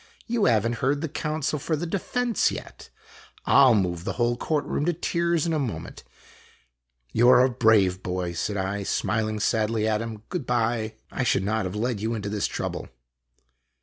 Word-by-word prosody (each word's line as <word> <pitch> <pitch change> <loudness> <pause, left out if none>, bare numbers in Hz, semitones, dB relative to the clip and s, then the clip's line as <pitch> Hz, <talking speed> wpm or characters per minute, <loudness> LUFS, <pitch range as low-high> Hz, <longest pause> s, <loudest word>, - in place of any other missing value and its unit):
" - - -26
You 225 - +2
have 115 -2 +3
n't 120 0 -2
heard 140 +3 +1
the 160 - -1
counsel 155 0 -2
for 155 +3 -1
the 160 +3 -3
defense 230 +7 0
yet. - - -9 0.6
I 140 - +6
'11 110 -6 +4
move 85 -2 -4
the - - -3
whole 120 0 +1
court 150 +4 -1
room - - -2
to 175 - +2
tears 170 0 0
in 165 - 0
a 155 - +1
moment." 130 -6 -5 0.6
" - - -42
You 120 +2 +5
are 125 0 +7
a 130 - 0
brave 105 -6 +3
boy," 90 -1 -3
said 100 +4 -2
I, 95 +2 -2
smiling 110 +2 -1
sadly 110 +1 +1
at 110 0 +1
him. 110 -2 -6
" - - -41
Good 170 -9 -4
by! 115 -2 0 0.2
I - - -3
should 105 - +2
not 110 0 0
have 95 +2 -4
led 115 0 -1
you 115 +2 -1
into 105 -2 -4
this 105 0 -1
trouble." - - -4
115 Hz, 205 wpm, -25 LUFS, 105-140 Hz, 0.6 s, are